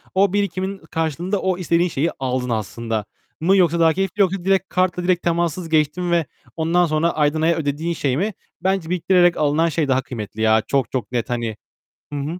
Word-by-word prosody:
O 195 Hz, 0 st, +3 dB
birikimin 195 Hz, -1 st, -1 dB
karşılığında 165 Hz, +5 st, -1 dB
o 185 Hz, -1 st, 0 dB
istediğin 175 Hz, 0 st, +1 dB
şeyi 160 Hz, +3 st, 0 dB
aldın 130 Hz, -1 st, -2 dB
aslında. 110 Hz, 0 st, -3 dB, 0.3 s
Mı 190 Hz, +5 st, +3 dB
yoksa 170 Hz, -2 st, +3 dB
daha 160 Hz, -1 st, +5 dB
keyifli 195 Hz, +2 st, -1 dB
yoksa 190 Hz, -1 st, +1 dB
direkt 195 Hz, 0 st, +2 dB
kartla 180 Hz, -1 st, 0 dB
direkt 180 Hz, -1 st, +1 dB
temassız 170 Hz, 0 st, -1 dB
geçtin 160 Hz, +3 st, +1 dB
ve 170 Hz, -3 st, +2 dB, 0.3 s
ondan 170 Hz, +2 st, +2 dB
sonra 155 Hz, +1 st, +1 dB
aydan 150 Hz, +1 st, +1 dB
aya 165 Hz, +1 st, +3 dB
ödediğin 160 Hz, +3 st, -2 dB
şey 140 Hz, -4 st, -1 dB
mi? 205 Hz, +4 st, -1 dB, 0.3 s
Bence 190 Hz, -3 st, 0 dB
biriktirerek 175 Hz, 0 st, +3 dB
alınan 155 Hz, +3 st, +2 dB
şey 150 Hz, -1 st, 0 dB
daha 130 Hz, 0 st, +2 dB
kıymetli 110 Hz, -4 st, -7 dB
ya. 110 Hz, 0 st, +4 dB
Çok, 135 Hz, -3 st, 0 dB
çok 125 Hz, -4 st, -3 dB
net 120 Hz, -1 st, -2 dB
hani. 115 Hz, -3 st, -2 dB, 0.6 s
Hı 145 Hz, -, -2 dB
hı. 140 Hz, -, -3 dB
165 Hz, 190 wpm, -21 LUFS, 140-180 Hz, 0.6 s, daha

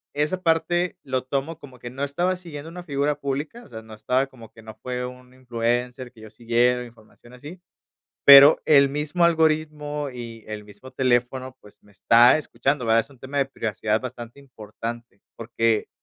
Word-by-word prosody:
esa 150 Hz, +6 st, -1 dB
parte 175 Hz, +1 st, 0 dB
lo 130 Hz, -1 st, -2 dB
tomo 140 Hz, +5 st, -3 dB
como 130 Hz, -5 st, -14 dB
que 120 Hz, -, -8 dB
no 135 Hz, +3 st, -6 dB
estaba 175 Hz, +6 st, -1 dB
siguiendo 165 Hz, -4 st, -9 dB
una 175 Hz, +1 st, -9 dB
figura 145 Hz, -1 st, -1 dB
pública, 145 Hz, -, -4 dB
o -, -, -16 dB
sea, 110 Hz, -3 st, -9 dB
no 110 Hz, 0 st, -14 dB
estaba 130 Hz, +5 st, 0 dB
como 115 Hz, -4 st, -15 dB
que 110 Hz, -, -16 dB
no 110 Hz, -1 st, -11 dB
fue 125 Hz, +2 st, -5 dB
un 125 Hz, 0 st, -11 dB
influencer 125 Hz, 0 st, -3 dB
que 115 Hz, -3 st, -18 dB
yo 110 Hz, -, -11 dB
siguiera 120 Hz, +2 st, +1 dB
información 120 Hz, +1 st, -18 dB
así, 150 Hz, +8 st, -11 dB, 0.6 s
pero 140 Hz, +2 st, +9 dB
el 140 Hz, -2 st, +6 dB
mismo 150 Hz, +5 st, -1 dB
algoritmo 155 Hz, -3 st, 0 dB
y 115 Hz, -2 st, -9 dB
el 105 Hz, -1 st, -7 dB
mismo 105 Hz, +6 st, -14 dB
teléfono, 130 Hz, 0 st, -1 dB
pues, 105 Hz, -, -19 dB
me 105 Hz, -, -23 dB
está 120 Hz, +6 st, +5 dB
escuchando, 140 Hz, -3 st, -2 dB
¿verdad? 115 Hz, 0 st, +4 dB
Es 115 Hz, -, -10 dB
un 135 Hz, -, -18 dB
tema 135 Hz, +3 st, -5 dB
de 135 Hz, -, +2 dB
privacidad 110 Hz, -3 st, -2 dB
bastante 125 Hz, +1 st, -9 dB
importante, 115 Hz, -3 st, -9 dB, 0.2 s
porque 115 Hz, -1 st, -1 dB
130 Hz, 180 wpm, -23 LUFS, 115-145 Hz, 0.6 s, pero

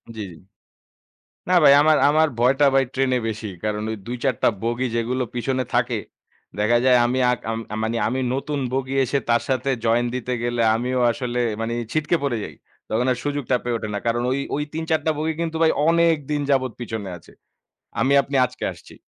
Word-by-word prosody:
জি, 110 Hz, -, -5 dB
জি। -, -, -12 dB, 1.1 s
না 185 Hz, -, +3 dB
ভাই 140 Hz, -, +9 dB
আমার, 155 Hz, 0 st, +4 dB
আমার 155 Hz, +1 st, +4 dB
ভয়টা 135 Hz, +4 st, +3 dB
ভাই 135 Hz, 0 st, +4 dB
ট্রেনে 130 Hz, -1 st, +1 dB
বেশি। 110 Hz, -1 st, -4 dB, 0.2 s
কারণ 105 Hz, 0 st, -1 dB
ওই 110 Hz, -, -3 dB
২ 125 Hz, +1 st, -4 dB
৪ 130 Hz, -3 st, +2 dB
টা -, -, +5 dB
বগি 120 Hz, +2 st, -1 dB
যেগুলো 125 Hz, +3 st, -1 dB
পিছনে 130 Hz, +1 st, -1 dB
থাকে 120 Hz, -2 st, +1 dB, 0.6 s
দেখা 115 Hz, +3 st, +3 dB
যায়, 125 Hz, -1 st, +6 dB
আমি 130 Hz, +2 st, -1 dB
আ -, -, +3 dB, 0.5 s
মানে 115 Hz, +1 st, -1 dB
আমি 130 Hz, +3 st, -1 dB
নতুন 145 Hz, +2 st, -3 dB
বগি 135 Hz, 0 st, -2 dB
এসে 140 Hz, +3 st, 0 dB
তার 120 Hz, -, +3 dB
সাথে 130 Hz, +1 st, 0 dB
জয়েন 120 Hz, +2 st, +2 dB
দিতে 125 Hz, 0 st, -3 dB
গেলে 120 Hz, 0 st, -1 dB
আমিও 125 Hz, +2 st, -1 dB
আসলে 125 Hz, -2 st, -4 dB, 0.2 s
মানে 115 Hz, +1 st, -2 dB, 0.2 s
ছিটকে 155 Hz, +2 st, +1 dB
পড়ে 120 Hz, -5 st, 0 dB
যাই। 80 Hz, -, -9 dB, 0.4 s
তখন 120 Hz, +3 st, +1 dB
আর -, -, -3 dB
সুযোগটা 145 Hz, -3 st, 0 dB
পেয়ে 120 Hz, -1 st, -2 dB
ওঠে 110 Hz, -, -5 dB
না। -, -, -1 dB
কারণ 120 Hz, +1 st, +1 dB
ওই, 135 Hz, -, 0 dB, 0.2 s
ওই 150 Hz, -, -1 dB
৩ 160 Hz, 0 st, -2 dB
৪ 160 Hz, -, +3 dB
টা -, -, +4 dB
বগি 160 Hz, +1 st, -1 dB
কিন্তু 165 Hz, -1 st, -2 dB
ভাই 160 Hz, -, +5 dB, 0.2 s
অনেক 170 Hz, -1 st, +4 dB
দিন 145 Hz, -1 st, 0 dB
যাবৎ 130 Hz, -3 st, +1 dB
পিছনে 110 Hz, -4 st, -5 dB
আছে। -, -, -19 dB, 0.7 s
আমি 135 Hz, -, +2 dB
আপনি 140 Hz, 0 st, -3 dB
আজকে 125 Hz, 0 st, -8 dB
আসছি। -, -, -15 dB
125 Hz, 200 wpm, -22 LUFS, 120-140 Hz, 1.1 s, ভাই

